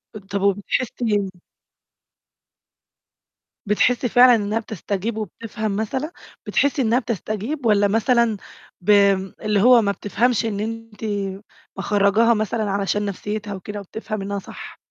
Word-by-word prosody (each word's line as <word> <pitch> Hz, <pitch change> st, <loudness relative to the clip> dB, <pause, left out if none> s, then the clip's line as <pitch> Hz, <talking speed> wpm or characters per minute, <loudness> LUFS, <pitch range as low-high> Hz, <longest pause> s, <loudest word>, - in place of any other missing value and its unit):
أد 200 Hz, -2 st, -9 dB
طَب 200 Hz, 0 st, -3 dB
وبتحسّي 205 Hz, +1 st, 0 dB, 2.4 s
بتحسّي 240 Hz, +4 st, +2 dB
فعلًا 245 Hz, 0 st, +7 dB
إنّها 210 Hz, +1 st, -1 dB
بتستجيب 210 Hz, +1 st, -4 dB
وبتفهم 215 Hz, -1 st, -4 dB
مثلًا، 260 Hz, +9 st, -2 dB, 0.4 s
بتحسّي 285 Hz, 0 st, +1 dB
إنّها 235 Hz, +1 st, +3 dB
بتستجيب، 230 Hz, -, -4 dB
والّا 205 Hz, -2 st, +4 dB
مثلًا 230 Hz, 0 st, +2 dB, 0.4 s
بم 200 Hz, -1 st, +3 dB
اللي 210 Hz, -2 st, +1 dB
هو 245 Hz, 0 st, +7 dB
ما 200 Hz, -1 st, +1 dB
بتفهمش 230 Hz, +3 st, 0 dB
إن 205 Hz, -2 st, -2 dB
أنتِ 225 Hz, 0 st, -6 dB, 0.7 s
مخرّجاها 205 Hz, +4 st, +3 dB
مثلًا 215 Hz, -1 st, -1 dB
علشان 200 Hz, +1 st, 0 dB
نَفْسيتها 205 Hz, +1 st, -4 dB
وكده 205 Hz, +2 st, -6 dB
وبتفهم 215 Hz, +1 st, -6 dB
إنّها 200 Hz, 0 st, -3 dB
صح؟ -, -, -10 dB
215 Hz, 115 wpm, -22 LUFS, 200-230 Hz, 2.4 s, فعلًا